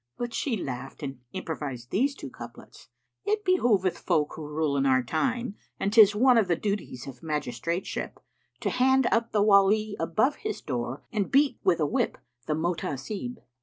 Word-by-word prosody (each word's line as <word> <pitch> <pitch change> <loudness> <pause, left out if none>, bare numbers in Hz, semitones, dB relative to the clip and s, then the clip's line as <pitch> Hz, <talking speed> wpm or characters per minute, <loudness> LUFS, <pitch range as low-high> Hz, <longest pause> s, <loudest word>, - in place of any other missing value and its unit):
But 240 -1 -4
she 250 -6 -1
laughed 135 -2 -6
and 135 -2 -5
improvised 145 -9 -5
these 275 +7 +1
two - - -8
couplets, - - -12 0.4
"It 420 0 -1
behoveth 230 - +2
folk 155 -5 +1
who 155 -2 -7
rule 150 -1 -1
in 140 0 +2
our 130 -1 +4
time, 235 - -1
* - - -45
And 200 - -1
'tis 210 -2 +7
one 250 +2 +5
of 210 - +1
the 170 - +2
duties 200 - -3
of 130 -3 -10
magistrateship, 150 +2 -3 0.5
To - - 0
hand 265 +1 +3
up 230 0 +1
the 205 -1 +3
Wali 205 +1 +4
above 215 - +1
his 430 0 -4
door 125 -1 -4
* - - -47
And 205 -3 0
beat 275 -1 +3
with 175 -3 +3
a 155 - +2
whip 145 - 0 0.3
the 150 - +1
Mohtasib!" 175 - -3
190 Hz, 180 wpm, -27 LUFS, 150-235 Hz, 0.5 s, tis